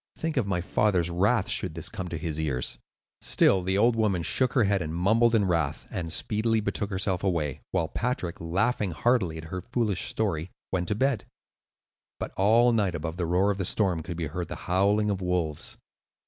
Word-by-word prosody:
Think 160 -1 -2
of 125 -7 +1
my 90 -3 0
father's 90 -2 +1
wrath, 100 +4 +2
should 90 -6 -2
this 85 - -5
come 90 - -5
to 85 - -4
his 80 -1 -4
ears." 65 -6 -1 0.4
Still 95 - +4
the 95 +2 0
old 115 +3 +4
woman 100 -6 +1
shook 125 +8 +1
her 120 - +4
head 100 -1 +2
and 80 0 -4
mumbled 115 +6 +3
in 105 -3 +3
wrath, 85 -3 0
and 85 -3 -4
speedily 110 +6 0
betook 100 -1 -2
herself 95 -1 -1
away; 80 -8 -1
while 90 -4 0
Patrick, 115 -6 -3
laughing 100 +3 0
heartily 95 -2 +1
at 80 - -7
her 90 - -3
foolish 115 -5 -1
story, 95 -6 -1 0.2
went 90 -2 -1
to 105 - 0
bed. 130 -2 +1 0.9
But - - -4
all 115 +5 +5
night 100 -6 +1
above 80 +1 -4
the 85 -3 -1
roar 90 +4 +3
of 100 - -4
the - - 0
storm 90 -2 0
could 85 +1 -6
be 85 - -2
heard 85 +3 -4
the - - -5
howling 100 +3 +2
of 95 -1 -2
wolves. 90 -4 -2
95 Hz, 200 wpm, -27 LUFS, 85-105 Hz, 0.9 s, all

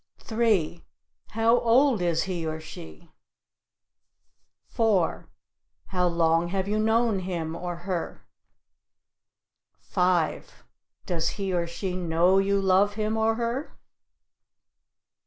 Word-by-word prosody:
3. 215 -8 0 0.5
How 225 +2 +3
old 240 -1 +3
is 170 -2 +1
he 180 -3 -4
or 160 0 -3
she? 80 - -12 1.5
4. 210 -7 0 0.6
How 180 -2 +1
long 165 0 +2
have 190 +1 -2
you 210 +1 0
known 220 -1 +2
him 170 -3 -4
or 175 0 -4
her? 180 -4 -4 1.5
5. 180 -3 -1 0.4
Does 165 -2 -1
he 195 -2 -2
or 170 -1 0
she 180 +2 -4
know 175 +2 +2
you 200 0 +1
love 195 +2 +3
him 215 0 -1
or 220 0 +1
her? 240 +5 -3
185 Hz, 105 wpm, -26 LUFS, 170-220 Hz, 1.5 s, How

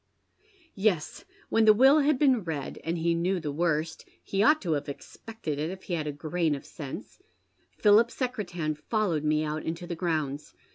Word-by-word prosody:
" 385 -6 -32 0.2
Yes, 170 - -5 0.2
when 225 0 +3
the 215 -1 +7
will 270 +6 +6
had 295 -1 +3
been 260 -6 +3
read, 155 -5 -5
and 165 +1 -2
he 170 +1 +1
knew 180 +3 0
the 150 -3 -4
worst 160 0 -1
— - - -42
he 195 - -3
OTight 300 +10 +5
to 175 - -2
have 145 -1 -1
expected 155 +1 -7
it 155 +2 -1
if 190 +1 -8
he 180 - -5
had 155 -3 -2
a - - -1
grain 155 +2 -1
of 140 - -9
sense, 155 - -9 0.3
— - - -34
PliiJip 215 +2 +6
Secretan 190 - -3
followed 165 0 -1
me 155 0 +2
out 155 0 -3
into 165 +2 -4
the 175 -1 -4
grounds. 155 -4 -2
170 Hz, 200 wpm, -28 LUFS, 155-215 Hz, 0.3 s, the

